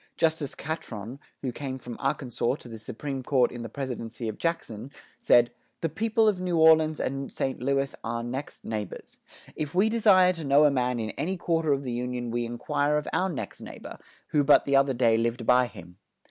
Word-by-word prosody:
Justice 160 -4 +1
Catron, 130 -6 -6 0.2
who 130 - -1
came 130 +1 -5
from 120 -2 -8
Arkansas 130 -2 -1
to 135 - -13
the 115 -2 -8
Supreme 130 +5 -5
Court 130 -1 +2
in 120 - -7
the 115 - -6
presidency 120 -3 -5
of 110 - -5
Jackson, 135 -8 -3 0.3
said: 120 0 +5 0.3
"The 165 - 0
people 225 +4 +1
of 195 -4 +1
New 180 -2 0
Orleans 160 -1 +5
and 135 +1 -3
St. 135 -2 -3
Louis 135 +1 0
are 115 +1 -3
next 130 +4 -6
neighbors 105 -4 -5 0.4
if 150 +1 -4
we 200 +4 +4
desire 200 -5 +5
to 165 -2 -7
know 140 +1 +5
a 145 - +5
man 125 -2 0
in 110 -1 -2
any 185 +4 -3
quarter 165 -3 0
of 140 0 +1
the 125 -2 -3
union 125 0 -3
we 120 0 -1
inquire 145 +5 0
of 150 - -3
our 190 +1 +1
next 160 - -6
neighbor, - - -9 0.3
who 150 -1 +3
but 145 - +5
the 140 - +2
other 135 -1 +4
day 115 -2 +3
lived 115 +1 -1
by 125 +1 +5
him." 90 -5 -13
135 Hz, 200 wpm, -27 LUFS, 120-155 Hz, 0.4 s, said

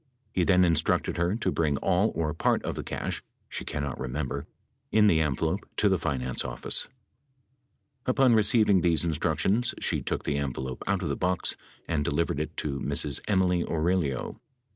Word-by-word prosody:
He 90 - +2
then 90 0 +5
instructed 85 -1 +1
her 85 +3 +1
to 115 - -1
bring 75 -4 +1
all 95 +7 +2
or 75 -2 -1
part - - +1
of - - -2
the - - -4
cash - - -3 0.3
(she - - -5
cannot 70 -3 -4
remember) 65 +2 -3 0.4
in 110 -1 +5
the 80 -6 +4
envelope 70 -4 0 0.2
to - - +3
the - - +2
finance 65 -3 -2
office. - - +1 1.2
Upon 130 -1 +4
receiving 105 -3 +4
these 85 -2 +3
instructions, 85 - +1
she - - 0
took - - -2
the 70 - -1
envelope 65 -2 -4
out, 100 -1 0
of 80 - -2
the 70 - 0
box 90 +1 0 0.3
and 80 -3 0
delivered 80 -1 0
it 75 - -4
to 70 -2 -2
Ms. 70 0 -1
Emily 90 -3 +2
Aurelio. 80 -5 -1
80 Hz, 165 wpm, -27 LUFS, 70-95 Hz, 1.2 s, then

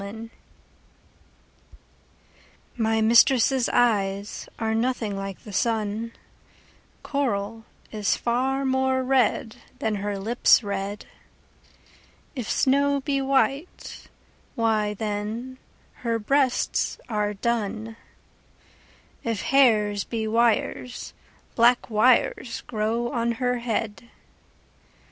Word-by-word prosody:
CXXX 220 +3 -8 2.5
My 225 -1 +1
mistress' 240 +3 +4
eyes 205 -4 0
are 220 -1 -1
nothing 225 -3 -1
like 195 -1 -6
the 210 - -10
sun; 220 +1 -1 0.9
Coral 225 -5 -2 0.3
is 210 -2 0
far 265 +3 0
more 265 0 +1
red, 250 -3 +1 0.2
than 220 -5 -1
her 200 0 -3
lips 230 +4 +3
red: 200 0 -4 1.3
If 245 -5 -5
snow 280 +1 +2
be 275 0 -1
white, 275 +4 -1 0.5
why 215 -3 +1
then 220 +5 -4 0.4
her 230 -2 -1
breasts 260 +3 +1
are 210 -2 -1
dun; 225 0 -2 1.3
If 230 -4 -2
hairs 210 -7 +3
be 225 -2 -3
wires, 235 +2 0 0.4
black 240 0 +3
wires 235 +2 +2
grow 230 +2 -2
on 235 0 0
her 250 0 -1
head. 230 -1 -3
230 Hz, 90 wpm, -25 LUFS, 210-250 Hz, 2.5 s, mistress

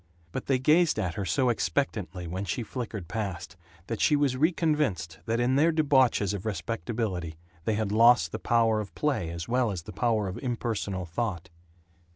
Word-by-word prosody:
But - - -5
they 135 - +3
gazed 155 +6 +3
at 90 -2 -1
her 100 +2 -3
so 125 +9 +2
expectantly 105 -7 -1
when 90 +4 -4
she 110 +5 -2
flickered 110 -6 -5
past 95 -3 -4 0.3
that 115 0 -4
she 150 - +4
was 145 -3 +2
reconvinced 150 - 0
that 115 +1 0
in 125 +2 +2
their 160 +4 +4
debauches 135 - +3
of 100 -2 -4
respectability 95 -3 -3 0.3
they 110 - +1
had 105 -2 -1
lost 115 +3 +5
the - - -4
power 115 -2 +2
of 100 -5 -6
play 140 - 0
as 85 0 -5
well 125 -1 +2
as 90 -5 -4
the - - -9
power 110 -4 +1
of 95 - -5
impersonal 110 -7 -2
thought. 90 -1 -3
110 Hz, 180 wpm, -28 LUFS, 95-130 Hz, 0.3 s, lost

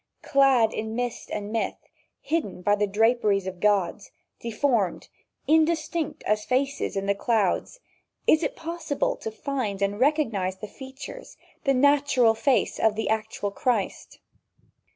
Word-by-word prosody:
Clad 270 -5 +4
in 220 0 -4
mist 245 -1 -3
and 210 0 -4
myth, 225 - -1 0.4
hidden 300 - -2
by 205 - +3
the 205 0 0
draperies 210 -1 +2
of 185 -1 -6
gods, 205 -1 +1 0.3
deformed, 230 -4 0 0.4
indistinct 320 0 +1
as 210 0 +1
faces 270 -3 -1
in 200 +1 0
clouds, 225 - 0 0.5
is 310 - +5
it 295 - -2
possible 330 -3 -2
to - - -5
find 220 -3 -3
and 200 +1 -1
recognize 230 -10 +1
the 210 - -7
features, 265 - -10 0.3
the 275 -1 +3
natural 280 -3 +4
face 255 +3 +1
of 220 -1 +3
the 220 - -2
actual 220 -2 -2
Christ? 230 -1 -2
225 Hz, 130 wpm, -26 LUFS, 205-280 Hz, 0.5 s, is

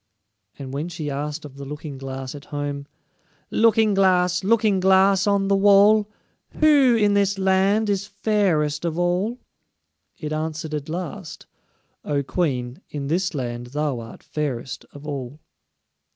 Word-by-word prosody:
And 135 -2 -7
when 150 +5 -3
she 155 -4 -5
asked 150 +2 -4
of 140 -2 -11
the 140 - -7
Looking 145 0 -7
glass 135 -1 -6
at 145 -1 -10
home: 145 -1 -4 0.6
"Looking 220 -1 +3
glass, 180 -2 +3
Looking 215 -1 +3
glass, 190 +1 +4
on 200 -1 +2
the 200 - +3
wall, 205 +2 +5 0.5
Who 285 -6 +5
in 210 -2 +3
this 200 0 +2
land 195 +3 +2
is 200 0 -1
fairest 190 -8 0
of 165 -1 -2
all?" 180 +7 0 0.8
it 155 -1 -5
answered 155 0 -4
at 150 0 -4
last: 180 +1 -6 0.6
"O 145 -1 -1
Queen, 130 -6 -2
in 140 -2 -5
this 180 +2 0
land 120 -2 -4
thou 145 -1 -2
art 115 0 -11
fairest 135 -4 -4
of 145 +1 -12
all." 140 -1 -6
170 Hz, 145 wpm, -23 LUFS, 145-200 Hz, 0.8 s, wall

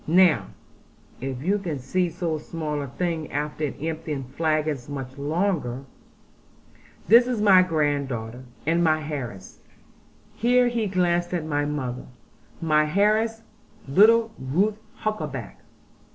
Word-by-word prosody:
Now 165 - +4 0.7
(if 130 0 -5
you 200 +5 +1
can 170 -7 -3
see 175 +8 0
so 165 -2 -3
small 150 -2 -4
a 140 - -4
thing, 165 +2 -3
after 150 0 -2
emptying 155 -3 -3
flagons 155 -1 -1
much 135 -2 -6
larger) 145 -4 -1 1.2
this 235 +3 +7
is 245 -3 -1
my 195 -3 +7
granddaughter, 140 -8 -1 0.2
and 165 +3 +2
my 155 -2 +2
heiress' 120 -11 -6 0.7
here 245 +1 +3
he 230 -3 -1
glanced 175 -1 +1
at 165 -3 -2
mother 145 -4 -2 0.5
'my 155 +1 +2
heiress, 220 +2 +2 0.4
little 225 +9 +5
Ruth 195 +11 0 0.2
Huckaback.' 150 - -4
155 Hz, 115 wpm, -25 LUFS, 140-185 Hz, 1.2 s, this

